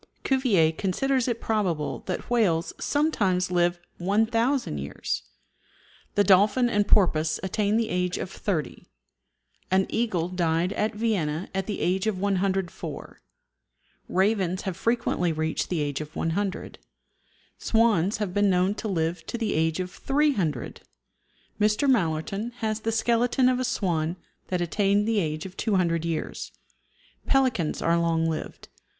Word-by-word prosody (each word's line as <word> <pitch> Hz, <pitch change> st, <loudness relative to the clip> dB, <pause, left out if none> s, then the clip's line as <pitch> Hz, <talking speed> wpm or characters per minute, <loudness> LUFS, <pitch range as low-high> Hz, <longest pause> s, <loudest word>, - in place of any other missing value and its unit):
Cuvier 230 Hz, -, +3 dB
considers 240 Hz, +10 st, 0 dB
it 235 Hz, -2 st, -1 dB
probable 185 Hz, -9 st, -1 dB
that 185 Hz, -, -3 dB
whales 190 Hz, -9 st, +1 dB
sometimes 200 Hz, -, +1 dB
live 175 Hz, 0 st, +2 dB, 0.2 s
1000 225 Hz, -, +1 dB
years. 70 Hz, -2 st, -3 dB, 0.9 s
The 205 Hz, -, +4 dB
dolphin 205 Hz, +6 st, +4 dB
and 205 Hz, -2 st, +1 dB
porpoise 160 Hz, -5 st, +3 dB
attain 205 Hz, +2 st, +1 dB
the 230 Hz, -1 st, 0 dB
age 180 Hz, 0 st, -1 dB
of 190 Hz, -, -5 dB
30; 175 Hz, -8 st, -3 dB, 0.8 s
an 190 Hz, +1 st, +3 dB
eagle 200 Hz, -8 st, 0 dB
died 175 Hz, 0 st, 0 dB
at 210 Hz, 0 st, -1 dB
Vienna 190 Hz, -7 st, -1 dB
at 190 Hz, -1 st, -2 dB
the 210 Hz, -, -3 dB
age 185 Hz, +3 st, +1 dB
of 215 Hz, -3 st, 0 dB
104; 195 Hz, -2 st, -2 dB, 0.9 s
ravens 190 Hz, -1 st, +1 dB
have 190 Hz, -3 st, -3 dB
frequently 230 Hz, -7 st, 0 dB
reached 160 Hz, 0 st, -2 dB
the 175 Hz, -4 st, 0 dB
age 145 Hz, 0 st, -2 dB
of 155 Hz, 0 st, -9 dB
100; 190 Hz, +4 st, -2 dB, 0.8 s
swans 220 Hz, -4 st, +2 dB
have 205 Hz, -4 st, -3 dB
been 205 Hz, 0 st, +3 dB
known 185 Hz, +1 st, +2 dB
to 220 Hz, -, -5 dB
live 165 Hz, -3 st, -1 dB
to -, -, -3 dB
the 225 Hz, -2 st, -1 dB
age 160 Hz, +2 st, +1 dB
of 180 Hz, 0 st, -3 dB
300. 235 Hz, -, 0 dB, 0.8 s
Mr. 210 Hz, +6 st, +2 dB
Malerton 195 Hz, 0 st, 0 dB
has 220 Hz, -3 st, -2 dB
the 225 Hz, +1 st, -2 dB
skeleton 240 Hz, +3 st, +2 dB
of 255 Hz, 0 st, +2 dB
a -, -, 0 dB
swan 170 Hz, -8 st, -1 dB, 0.3 s
that 180 Hz, -1 st, -1 dB
attained 200 Hz, +4 st, +1 dB
the 225 Hz, -2 st, +2 dB
age 155 Hz, -2 st, -2 dB
of 190 Hz, -1 st, -9 dB
200 175 Hz, -6 st, +1 dB
years. 165 Hz, -2 st, -4 dB, 0.8 s
Pelicans 255 Hz, -, +1 dB
are 170 Hz, 0 st, +3 dB
long 165 Hz, -1 st, +1 dB
lived. 160 Hz, -1 st, -5 dB
190 Hz, 140 wpm, -26 LUFS, 170-220 Hz, 0.9 s, The